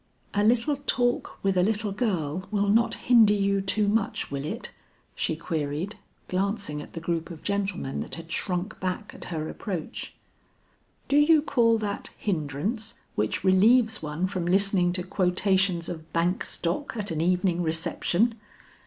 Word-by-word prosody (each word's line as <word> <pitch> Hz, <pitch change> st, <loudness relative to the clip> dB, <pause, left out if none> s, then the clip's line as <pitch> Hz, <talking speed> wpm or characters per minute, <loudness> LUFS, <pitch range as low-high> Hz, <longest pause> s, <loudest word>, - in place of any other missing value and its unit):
"A 205 Hz, -, +2 dB
little 240 Hz, +6 st, +3 dB
talk 245 Hz, -1 st, +1 dB
with 195 Hz, -1 st, +2 dB
a 180 Hz, -, +4 dB
little 210 Hz, +1 st, 0 dB
girl 185 Hz, -, -1 dB
will 205 Hz, -1 st, +1 dB
not 230 Hz, +3 st, +3 dB
hinder 225 Hz, -4 st, +5 dB
you 200 Hz, -1 st, +1 dB
too 205 Hz, +2 st, +1 dB
much, 205 Hz, -6 st, 0 dB
will 140 Hz, 0 st, -3 dB
it?" -, -, -5 dB, 0.4 s
she 160 Hz, -, -1 dB
queried, 160 Hz, +4 st, -3 dB, 0.3 s
glancing 195 Hz, -5 st, -2 dB
at -, -, -12 dB
the 165 Hz, -, -5 dB
group 165 Hz, 0 st, -2 dB
of 165 Hz, -3 st, -10 dB
gentlemen 195 Hz, -8 st, -2 dB
that -, -, -5 dB
had 165 Hz, 0 st, -10 dB
shrunk 185 Hz, +3 st, -2 dB
back 185 Hz, +3 st, -3 dB
at -, -, -9 dB
her 155 Hz, -2 st, -3 dB
approach. 180 Hz, -4 st, -5 dB, 0.9 s
"Do 280 Hz, -, +3 dB
you 300 Hz, 0 st, +6 dB
call 230 Hz, -6 st, +3 dB
that 205 Hz, -2 st, -4 dB
hindrance 200 Hz, -, -2 dB, 0.2 s
which 105 Hz, +9 st, -1 dB
relieves 220 Hz, +4 st, +4 dB
one 155 Hz, +3 st, -2 dB
from 185 Hz, -2 st, -2 dB
listening 190 Hz, -1 st, +3 dB
to 180 Hz, -1 st, +1 dB
quotations 185 Hz, -1 st, +1 dB
of 160 Hz, -2 st, -7 dB
bank 170 Hz, +2 st, +1 dB
stock 185 Hz, +10 st, -2 dB
at 205 Hz, -3 st, -3 dB
an 160 Hz, -1 st, -1 dB
evening 180 Hz, 0 st, +2 dB
reception?" 175 Hz, +6 st, +1 dB
190 Hz, 155 wpm, -26 LUFS, 170-215 Hz, 0.9 s, you